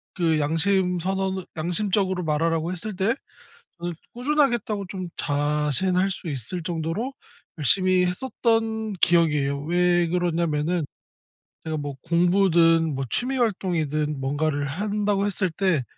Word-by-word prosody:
그 165 -4 +2
양심선언을 190 +3 0
양심적으로 185 +2 0
말하라고 165 +2 0
했을 195 +3 -5
때 200 +6 +1 0.6
저는 175 0 -3 0.2
'꾸준하게 275 +1 +2
했다.'고 205 -3 -4
좀 185 -2 -5
자신할 150 +6 +1
수 180 -3 -5
있을 140 +5 -4
정도로 170 - -3 0.4
열심히 185 +5 +4
했었던 220 +1 -1
기억이에요. 150 -6 +2
왜 175 +1 +2
그러냐면은 170 -2 0 0.8
제가 160 -1 -2
뭐 145 -1 -4
공부든 170 -2 +3
뭐 135 0 -2
취미 265 +2 0
활동이든 160 - -1
뭔가를 145 +1 -1
한다고 205 +5 -1
했을 195 -2 0
때 170 -5 +1
175 Hz, 285 characters per minute, -24 LUFS, 155-195 Hz, 0.8 s, 열심히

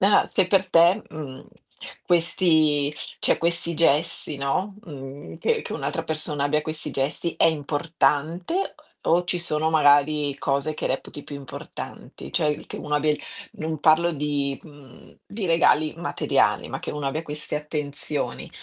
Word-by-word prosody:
Ah, 200 +2 +5
se 190 - +2
per 195 0 +2
te, 175 +5 +5
mhmm, 140 -4 -8 0.6
questi 160 -4 +3 0.2
cioè - - +4
questi 170 0 0
gesti, 155 -1 +1
no, 185 +9 -1
mhmm 135 - -9
che - - +1
che - - -7
un'altra - - -3
persona 150 -2 -2
abbia 150 +1 +1
questi 155 -2 -4
gesti 140 +5 -1
è - - +5
importante 155 - 0
o 390 +2 -1 0.3
o 170 +2 +4
ci 175 0 0
sono 160 -2 +2
magari 145 -1 +4
cose 140 +3 0
che - - -3
reputi 135 +2 -4
più - - -8
importanti? 135 - -9
Cioè 150 -1 0
che - - -7
uno 150 -1 -3
abbia 150 +1 +2 0.4
non 155 0 -4
parlo 165 +3 +5
di 145 -2 -1
mhmm, 145 -5 -16
di 200 -2 -4
regali 160 -2 +3
materiali, 170 - +1
ma - - -4
che - - -5
uno 150 -2 -3
abbia 155 +4 -3
queste 150 0 -2
attenzioni 150 -1 -3
150 Hz, 150 wpm, -24 LUFS, 145-165 Hz, 0.6 s, Ah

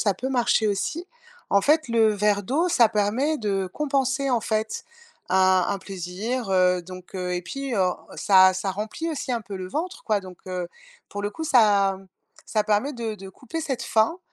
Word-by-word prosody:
ça 205 -3 +2
peut 260 - -4
marcher 240 -3 +2
aussi. 290 - -2 0.4
En 200 - +5
fait, 305 +5 +2
le 230 -1 +4
verre 205 0 +1
d'eau, 295 - 0
ça 240 -9 +5
permet 220 +10 +1
de 195 -3 -1
compenser, 275 -2 0
en 240 -2 +2
fait, 220 -1 -2 0.4
un 185 0 +4
un 200 - -1
plaisir, 195 +6 -4
heu, 180 -1 +3
donc, 185 +1 -11
heu, 180 -1 -3
et 175 - -3
puis, 270 +8 -4
heu, 185 -3 +2 0.3
ça 190 -2 +6
ça 185 +1 -2
remplit 215 - -4
aussi 295 -4 -4
un 235 - -1
peu 200 0 -8
le 185 0 -6
ventre, 340 - -4
quoi. 215 -2 +1
Donc, 185 -2 -12
heu, 180 -1 -3 0.4
pour 205 - -5
le 205 - -1
coup, 320 - -6
ça 205 -8 +4 0.5
ça 215 -2 0
permet 215 +7 +1
de 230 -4 -4
de 195 -1 -10
couper 255 - -7
cette 265 -6 -3
faim, 225 +10 +1
210 Hz, 195 wpm, -24 LUFS, 190-260 Hz, 0.5 s, ça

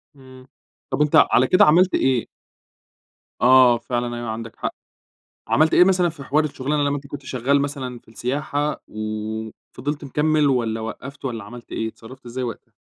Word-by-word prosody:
إمم، 130 -1 -15 0.4
طب - - -1
أنت 150 -1 +2 0.2
على 130 - +4
كده 190 +7 +6
عملت 180 +4 +4
إيه؟ 130 -3 +1 1.1
آه 125 -1 +6
فعلًا 120 0 -3
أيوه 120 -1 -5
عندك 115 +1 -6
حق. - - -4 0.8
عملت 155 +2 +3
إيه 180 - +7
مثلًا 180 -2 +3
في 155 -4 -8
حوار 150 +3 +2
الشغلانة 145 0 -1
لما 145 0 +1
أنت 140 0 -9
كنت 140 0 -8
شغال 130 +3 +1
مثلًا 135 -4 -4
في - - -30
السياحة 145 +5 -2
وفضلت 110 +7 -5
مكمل، 150 +2 +1
والّا 115 -4 0
وقّفت 130 +6 -8
والّا 115 -5 -4
عملت 120 +3 -12
إيه، 110 - -2
اتصرفت 125 +3 -13
إزاي 125 +2 -4
وقتها؟ 115 -2 -8
130 Hz, 165 wpm, -22 LUFS, 120-145 Hz, 1.1 s, إيه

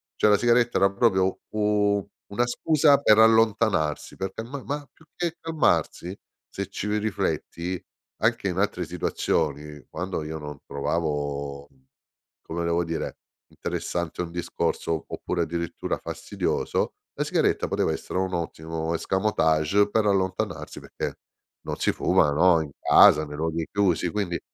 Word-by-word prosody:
Cioè 105 - +3
la 105 - +6
sigaretta 120 +1 +3
era 100 - +5
proprio 95 -3 +2
u 105 -1 +1 0.2
una 120 +4 +1
scusa 145 +3 +4
per 110 -6 +5
allontanarsi, 110 -8 +3
perché 95 +3 -4
ma 130 +4 -7
ma 145 0 -4
più 160 - -22
che 170 -1 -2
calmarsi, 150 - 0 0.3
se - - -4
ci 105 - -4
ri 105 0 +1
rifletti, 90 -3 -2 0.4
anche - - +2
in - - -2
altre - - 0
situazioni, 75 -3 -2
quando 90 -3 -3
io 80 +1 -5
non 75 -2 -7
trovavo, 70 -2 -2
mhmm, 65 -1 -30 0.6
come 85 +1 -3
devo 85 0 +1
dire, 80 0 -4 0.3
interessante 85 -1 -3
un 85 -1 -4
discorso, 85 -2 -2
oppure 90 - -3
addirittura 85 0 -3
fastidioso, - - -2 0.3
la - - +3
sigaretta - - +1
poteva - - 0
essere - - -3
un 95 0 -1
ottimo 80 -1 -3
escamotage 95 0 +2
per 110 +1 +1
allontanarsi 95 -2 -1
perché - - -5 0.5
non - - -3
si - - +2
fuma, 75 - +3
no, 85 +2 +5
in 75 - -5
casa, 75 +1 +7
nei 75 0 -8
luoghi 80 +1 -2
chiusi. 90 -4 +2
Quindi 90 -3 -2
90 Hz, 140 wpm, -25 LUFS, 80-105 Hz, 0.6 s, casa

